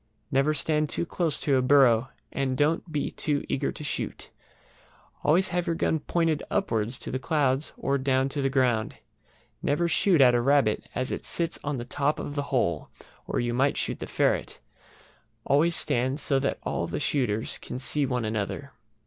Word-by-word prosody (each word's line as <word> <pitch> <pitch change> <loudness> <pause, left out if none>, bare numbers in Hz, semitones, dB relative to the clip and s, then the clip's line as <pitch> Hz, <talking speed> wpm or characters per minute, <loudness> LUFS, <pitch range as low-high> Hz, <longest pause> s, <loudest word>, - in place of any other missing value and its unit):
Never 135 +3 +2
stand 150 0 +1
too 170 - -2
close 165 -2 0
to 140 -3 +2
a - - +3
burrow, 125 -2 +4 0.2
and 130 -2 -1
don't 160 +3 +1
be 150 -2 -1
too 145 -2 -1
eager 135 - -1
to - - -9
shoot. 145 - -4 0.9
Always 180 +6 +3
have 175 0 -1
your 165 - +1
gun 160 - +1
pointed 165 0 0
upwards 115 +2 0
to - - -5
the 130 - -2
clouds 140 -1 0
or 140 0 0
down 130 0 +2
to 140 +1 -3
the 135 - +1
ground. 125 -5 +1 0.7
Never 170 +4 +1
shoot 175 0 +3
at 125 -2 +7
a 120 - +3
rabbit 135 -4 +2
as 130 - -1
it - - -4
sits 170 -1 -2
on 145 -1 -2
the 120 - -5
top 140 +4 0
of 145 - -5
the 145 - -1
hole, 85 - 0 0.4
or - - -1
you 120 0 -1
might 135 +3 +2
shoot - - -2
the - - -5
ferret. - - 0 0.9
Always 160 +4 +3
stand 130 +2 0
so 135 -2 +2
that 140 - -1
all - - -2
the - - -3
shooters 115 -6 0
can - - -6
see 135 +3 0
one 125 -3 -1
another. 110 +6 -3
140 Hz, 185 wpm, -27 LUFS, 125-150 Hz, 0.9 s, at